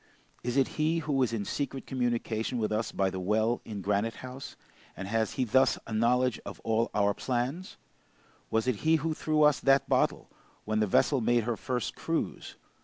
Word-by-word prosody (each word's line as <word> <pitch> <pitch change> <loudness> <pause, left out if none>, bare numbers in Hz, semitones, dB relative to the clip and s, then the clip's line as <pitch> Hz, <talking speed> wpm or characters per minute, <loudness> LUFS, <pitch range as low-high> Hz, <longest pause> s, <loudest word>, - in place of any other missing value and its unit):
Is 125 +2 -1
it 135 - +4
he 160 +2 +2
who 145 -4 0
is 125 - +2
in 110 -3 -2
secret 140 +1 -3
communication 120 -2 -1
with 110 -2 -1
us 110 +1 -1
by 95 -1 0
the 95 - -4
well 110 +5 +1
in 105 -3 -6
Granite 105 +3 0
House, 130 +1 -8 0.4
and 95 - -5
has 110 +1 0
he 130 - 0
thus 130 +2 +3
a 115 - -6
knowledge 125 +2 +2
of - - -8
all 115 +1 +1
our 100 0 +3
plans? 130 - -3 0.7
Was 110 0 +1
it 125 -4 0
he 160 +6 +3
who 160 +1 0
threw 155 0 +1
us 150 -1 +5
that 135 0 +3
bottle, - - +1 0.4
when 110 0 0
the 105 - +2
vessel 130 +7 +3
made 120 0 +2
her 120 +1 -1
first 125 0 -3
cruise? - - -3
120 Hz, 190 wpm, -29 LUFS, 110-135 Hz, 0.7 s, us